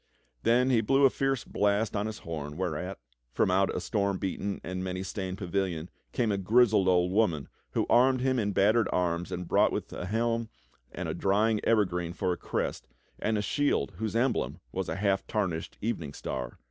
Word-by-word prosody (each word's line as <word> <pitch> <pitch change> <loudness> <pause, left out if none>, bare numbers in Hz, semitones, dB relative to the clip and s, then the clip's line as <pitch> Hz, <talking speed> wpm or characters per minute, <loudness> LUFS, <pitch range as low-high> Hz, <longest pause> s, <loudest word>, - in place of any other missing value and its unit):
Then 125 +3 +3
he 115 -3 +4
blew 135 +5 +4
a 135 - +6
fierce 135 -3 0
blast 105 +2 0
on 105 +1 0
his 110 -1 -5
horn, 75 -2 -6
whereat, 90 +1 -3 0.4
from - - +2
out 95 +1 +3
a - - 0
storm 100 -2 0
beaten 100 +1 -3
and 90 +1 -4
many 95 0 -3
stained 95 -1 -4
pavilion 90 -3 -2 0.2
came 115 -4 +1
a 100 - 0
grizzled 105 0 +4
old 90 -1 +3
w^oman 90 - +2 0.3
who - - +1
armed 130 +2 +4
him 130 -1 +2
in 105 -2 0
battered 105 +3 +3
arms 90 0 0
and 90 -1 -4
brought - - +3
him - - +1 0.2
a 90 - -4
helm 115 +2 0 0.5
with - - -3
a - - -2
drying 105 +2 +2
evergreen 90 -6 +1
for 95 -1 0
a - - -5
crest - - -3 0.3
and 110 0 0
a 105 - -1
shield 145 +7 0
wdiose 110 0 -2
emblem 125 +3 0
was 95 -1 -3
a - - -2
half 95 0 0
tarnished 90 -7 -2
evening 85 -11 -2
star. 65 -3 -5
100 Hz, 190 wpm, -29 LUFS, 90-115 Hz, 0.5 s, a